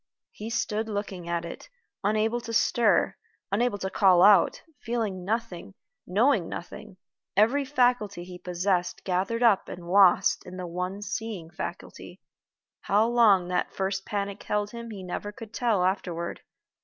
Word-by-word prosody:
He 215 Hz, +2 st, -7 dB
stood 220 Hz, -1 st, -2 dB
looking 200 Hz, -4 st, -5 dB
at 170 Hz, 0 st, -1 dB
it, 170 Hz, -, -9 dB, 0.3 s
unable 215 Hz, +3 st, +1 dB
to 230 Hz, -1 st, -7 dB
stir, 210 Hz, -4 st, +3 dB, 0.4 s
unable 225 Hz, +1 st, +1 dB
to 190 Hz, -1 st, -3 dB
call 185 Hz, -3 st, +5 dB
out 200 Hz, -3 st, +5 dB, 0.2 s
feeling 225 Hz, -7 st, -3 dB
nothing, 200 Hz, -3 st, -4 dB, 0.3 s
knowing 210 Hz, -1 st, +2 dB
nothing 210 Hz, +2 st, -8 dB, 0.4 s
every 250 Hz, +7 st, +3 dB
faculty 245 Hz, -9 st, +1 dB
he 180 Hz, 0 st, -10 dB
possessed 180 Hz, 0 st, -1 dB
gathered 195 Hz, +6 st, -1 dB
up 215 Hz, -5 st, +4 dB
and 175 Hz, -1 st, -8 dB
lost 190 Hz, 0 st, +4 dB
in 185 Hz, 0 st, -10 dB
the 180 Hz, -, -5 dB
one 180 Hz, +4 st, -4 dB
seeing 210 Hz, -6 st, -5 dB
faculty. -, -, -8 dB, 0.6 s
How 210 Hz, +3 st, +2 dB
long 215 Hz, -7 st, +4 dB
that 180 Hz, 0 st, -1 dB
first 195 Hz, 0 st, -2 dB
panic 200 Hz, 0 st, -4 dB
held 210 Hz, 0 st, -2 dB
him 235 Hz, 0 st, -8 dB
he 200 Hz, -4 st, -8 dB
never 185 Hz, +3 st, -5 dB
could 220 Hz, +1 st, -11 dB
tell 225 Hz, -7 st, +1 dB
afterward. 175 Hz, -3 st, -2 dB
200 Hz, 145 wpm, -27 LUFS, 180-225 Hz, 0.6 s, call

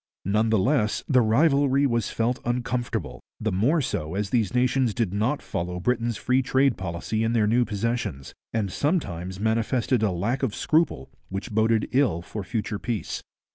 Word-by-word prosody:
None 105 Hz, +4 st, +2 dB
the 110 Hz, -, +3 dB
less 110 Hz, 0 st, +1 dB
the 130 Hz, -2 st, +4 dB
rivalry 140 Hz, +3 st, +3 dB
was 115 Hz, -5 st, 0 dB
felt 120 Hz, +2 st, -1 dB
uncomfortable, 120 Hz, 0 st, -2 dB, 0.2 s
the 110 Hz, 0 st, -1 dB
more 125 Hz, -, +2 dB
so 80 Hz, -, -3 dB
as 100 Hz, 0 st, -2 dB
these 115 Hz, -6 st, +1 dB
nations 125 Hz, -2 st, +2 dB
did 110 Hz, -6 st, -1 dB
not 110 Hz, +8 st, 0 dB
follow 90 Hz, +1 st, -3 dB
Britain's 120 Hz, +2 st, 0 dB
free 130 Hz, +4 st, +2 dB
trade 130 Hz, 0 st, +2 dB
policy 95 Hz, +5 st, -3 dB
in 115 Hz, +1 st, +1 dB
their 110 Hz, -3 st, +3 dB
new 120 Hz, +3 st, +3 dB
possessions, 105 Hz, -, -3 dB, 0.2 s
and 105 Hz, -4 st, -1 dB
sometimes 95 Hz, -, -2 dB
manifested 115 Hz, +3 st, +1 dB
a 110 Hz, -, +3 dB
lack 105 Hz, +9 st, -1 dB
of 125 Hz, -7 st, -1 dB
scruple 155 Hz, -, +1 dB, 0.2 s
which 95 Hz, +2 st, -5 dB
boded 110 Hz, 0 st, +2 dB
ill 125 Hz, -11 st, +2 dB
for 105 Hz, +3 st, -6 dB
future 105 Hz, +1 st, -3 dB
peace. 110 Hz, 0 st, -3 dB
115 Hz, 170 wpm, -25 LUFS, 100-125 Hz, 0.2 s, the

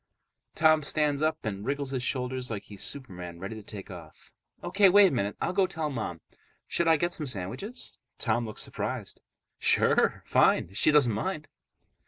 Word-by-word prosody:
Tom 155 Hz, -1 st, +5 dB
stands 150 Hz, -1 st, 0 dB
up 155 Hz, -2 st, 0 dB
and 100 Hz, -2 st, -3 dB
wriggles 140 Hz, +2 st, -2 dB
his 130 Hz, -2 st, -2 dB
shoulders 125 Hz, 0 st, -2 dB
like 110 Hz, -3 st, -4 dB
he's 100 Hz, -2 st, -11 dB
Superman 90 Hz, -11 st, -4 dB
ready 95 Hz, +5 st, -6 dB
to 110 Hz, -, -8 dB
take 100 Hz, -1 st, -9 dB
off. 85 Hz, -4 st, -13 dB, 0.3 s
"O.K. 195 Hz, +2 st, +4 dB
Wait 200 Hz, +1 st, +7 dB
a -, -, -6 dB
minute. 105 Hz, -6 st, -2 dB
I'll -, -, -1 dB
go 195 Hz, 0 st, +3 dB
tell 160 Hz, -5 st, -3 dB
Mom. 95 Hz, -, -4 dB, 0.5 s
Should 170 Hz, -, +1 dB
I 160 Hz, -1 st, +5 dB
get 175 Hz, +3 st, 0 dB
some 150 Hz, -, -2 dB
sandwiches?" 125 Hz, -, -4 dB, 0.2 s
Tom 120 Hz, +1 st, 0 dB
looks 110 Hz, -, 0 dB
surprised. -, -, -5 dB, 0.4 s
"Sure, -, -, +3 dB
fine, -, -, +3 dB
if 100 Hz, -, -9 dB
she -, -, +4 dB
doesn't 145 Hz, -7 st, +5 dB
mind." 155 Hz, -, -3 dB
130 Hz, 180 wpm, -28 LUFS, 105-155 Hz, 0.5 s, Wait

